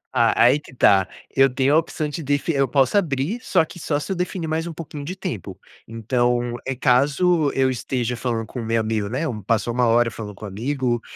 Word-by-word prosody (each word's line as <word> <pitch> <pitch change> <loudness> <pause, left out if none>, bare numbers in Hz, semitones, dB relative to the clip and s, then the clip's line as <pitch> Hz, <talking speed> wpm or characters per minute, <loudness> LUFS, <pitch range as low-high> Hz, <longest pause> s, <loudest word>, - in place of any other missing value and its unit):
Ah, 115 -2 +4
aí 130 +5 +5
que 130 - -16
tá, 95 -5 +4 0.3
eu 135 0 +5
tenho 135 +2 +1
a - - +6
opção 155 -2 -3
de 155 +3 -5
defi 145 +3 0
eu 135 -1 +2
posso 135 +3 +2
abrir, 165 - 0
só 165 - +2
que 175 - -12
só 145 -2 -1
se 150 - -6
eu 190 - 0
definir 180 -1 -3
mais 160 +2 -2
um 165 - -6
pouquinho 150 -2 -8
de 180 +6 -5
tempo. 180 - -6 0.3
Então 120 +1 0
é 135 - -1
caso 145 +5 +2
eu 135 -1 +3
esteja 125 -1 -2
falando 115 -2 -2
com 125 - -7
o - - -5
meu 115 0 +1
amigo, 110 -2 -1
né, 135 +8 -2
um 110 -6 -4
passou 115 +3 0
1 125 0 +2
hora 115 0 +3
falando 105 -2 -8
com 105 - -9
um - - -5
amigo, 120 +3 -2
130 Hz, 230 wpm, -22 LUFS, 115-150 Hz, 0.3 s, a